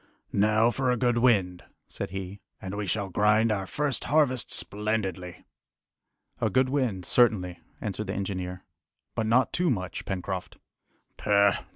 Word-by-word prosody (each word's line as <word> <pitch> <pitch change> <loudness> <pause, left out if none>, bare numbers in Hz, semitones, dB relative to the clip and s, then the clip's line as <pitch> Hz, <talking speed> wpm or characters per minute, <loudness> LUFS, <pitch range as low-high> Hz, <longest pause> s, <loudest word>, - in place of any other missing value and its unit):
"Now 110 +3 +3
for 130 +1 0
a 125 - +2
good 120 -1 +2
wind," 95 -8 +2 0.2
said - - -5
he, 95 +1 -6 0.2
"and 95 0 -6
we 105 -1 -3
shall 100 +1 -1
grind 105 +4 +3
our 95 -3 -1
first 145 +2 -1
harvest 140 -4 +2
splendidly!" 95 -4 -3 0.9
"A - - +1
good 130 0 +2
wind, 125 -10 -1
certainly," 95 -8 +2 0.2
answered 105 0 -3
the 95 - -3
engineer, 90 -2 -4 0.5
"but 110 - -1
not 125 +4 +3
too 180 0 +1
much, 95 -7 -2
Pencroft." 95 -1 -4 0.6
"Pooh! 100 -1 +4
105 Hz, 145 wpm, -27 LUFS, 95-120 Hz, 0.9 s, Pooh